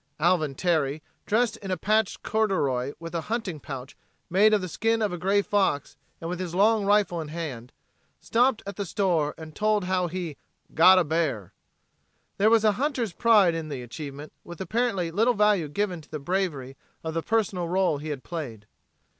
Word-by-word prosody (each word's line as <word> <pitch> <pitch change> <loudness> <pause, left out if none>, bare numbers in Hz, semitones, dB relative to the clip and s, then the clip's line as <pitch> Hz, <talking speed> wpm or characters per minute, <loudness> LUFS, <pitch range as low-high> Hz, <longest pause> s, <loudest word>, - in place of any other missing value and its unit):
Alvin 155 -4 +2
Terry, 155 -3 0 0.2
dressed 225 +1 +1
in 195 - -8
a 185 - 0
patched 215 0 0
corduroy 145 - 0
with 165 0 -8
a 170 - -1
hunting 215 -9 -2
pouch 135 -1 -8 0.4
made 205 +4 +5
of 215 - +4
the 185 - -4
skin 225 +6 0
of 210 -4 0
a - - -3
gray 200 +3 +2
fox 195 -10 0 0.2
and 165 - -6
with 180 +1 -4
his 180 -2 -4
long 210 +2 +3
rifle 205 -5 +2
in 155 - -6
his 155 - -9
hand, 130 -7 -6 0.5
stopped 245 0 +1
at 200 -1 -7
the 200 - -2
store 170 -6 0
and 160 -1 -10
told 215 -1 +1
how 180 -1 0
he 170 -4 -5 0.4
"got 185 +4 +7
a 185 - +5
bear." 150 - -1 0.9
There 210 +2 +5
was 225 -1 +4
a 215 - +5
hunter's 260 - -1
pride 210 -6 +4
in 165 -1 -4
the 135 -4 -5
achievement 145 +4 -8
with 175 -2 -10
apparently 195 -4 -1
little 225 +7 +2
value 210 -6 +3
given 180 +2 -2
to - - -20
the 155 - -4
bravery 145 -5 -2 0.3
of 160 0 -4
the 165 - -1
personal 195 -4 0
role 180 -4 +1
he 155 +2 -6
had 140 -3 -5
played. 125 -11 -6
180 Hz, 190 wpm, -26 LUFS, 155-210 Hz, 0.9 s, got